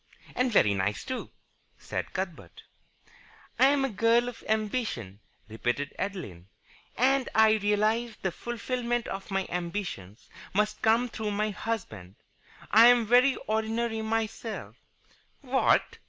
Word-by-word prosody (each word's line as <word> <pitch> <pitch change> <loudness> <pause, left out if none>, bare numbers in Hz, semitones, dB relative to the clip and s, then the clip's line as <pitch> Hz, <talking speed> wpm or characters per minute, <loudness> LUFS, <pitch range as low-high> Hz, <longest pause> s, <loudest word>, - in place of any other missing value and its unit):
"And 250 0 +1
very 105 - +4
nice, 100 +1 -1
too," 260 - -5 0.5
said - - -5
Cuthbert. - - -6 1.0
"I 265 - +7
am 280 -1 +2
a - - -1
girl 230 +3 +3
of 245 - -12
ambition," 215 - -2 0.3
repeated 120 +6 -2
Adeline, 170 - -5 0.5
"and 265 +1 +2
I 220 0 +6
realize 215 +3 +1
that - - -31
the 190 - 0
fulfilment 240 +2 -3
of 195 0 -6
my 195 -1 -1
ambitions 170 - -5 0.3
must 210 +1 0
come 230 +3 +3
through 220 -2 -4
my 210 +1 -1
husband. 110 - -5 0.6
I 225 +3 +8
am 245 -2 +5
very 250 +4 +5
ordinary 220 +1 -1
myself 225 0 -3 0.4
" - - -36
"What!" 265 -1 +1
220 Hz, 130 wpm, -28 LUFS, 190-240 Hz, 1.0 s, I